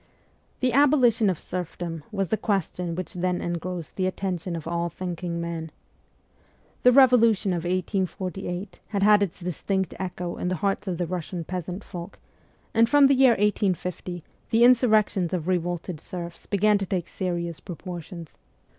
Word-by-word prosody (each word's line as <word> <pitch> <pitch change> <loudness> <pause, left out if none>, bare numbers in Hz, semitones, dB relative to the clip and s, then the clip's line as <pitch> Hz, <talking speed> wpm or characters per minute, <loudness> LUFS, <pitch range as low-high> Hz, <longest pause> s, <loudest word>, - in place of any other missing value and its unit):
The 255 -2 +2
abolition 255 -6 +4
of 185 - 0
serfdom 170 -2 -5
was 195 -4 -1
the - - +2
question 180 -5 -1
which 185 0 -5
then 180 0 -1
engrossed 175 -1 -4
the 185 -1 +1
attention 185 -2 -3
of 165 -1 -6
all 170 0 -1
thinking 175 0 -4
men. 170 -1 -4 1.1
The 250 - +7
Revolution 230 -6 +5
of 170 -1 -3
1848 185 +1 -3
had 200 -2 -1
had 210 0 +6
its 190 -4 -1
distinct 185 +1 -2
echo 180 -1 -4
in - - -2
the 185 - 0
hearts 195 +4 -1
of 180 -2 -1
the 175 - -1
Russian 175 0 -4
peasant 180 +3 -5
folk, 175 -1 -8 0.6
and 230 +1 +4
from 290 +1 +6
the 275 - +6
year 260 -2 +6
1850 185 -4 -1 0.3
the 230 0 +4
insurrections 215 -7 +4
of 175 -2 -2
revolted 175 -2 -1
serfs 170 0 -8
began 205 +1 +3
to 195 - -3
take 180 -2 -2
serious 170 -3 -3
proportions. 175 -2 -8
185 Hz, 155 wpm, -25 LUFS, 175-205 Hz, 1.1 s, The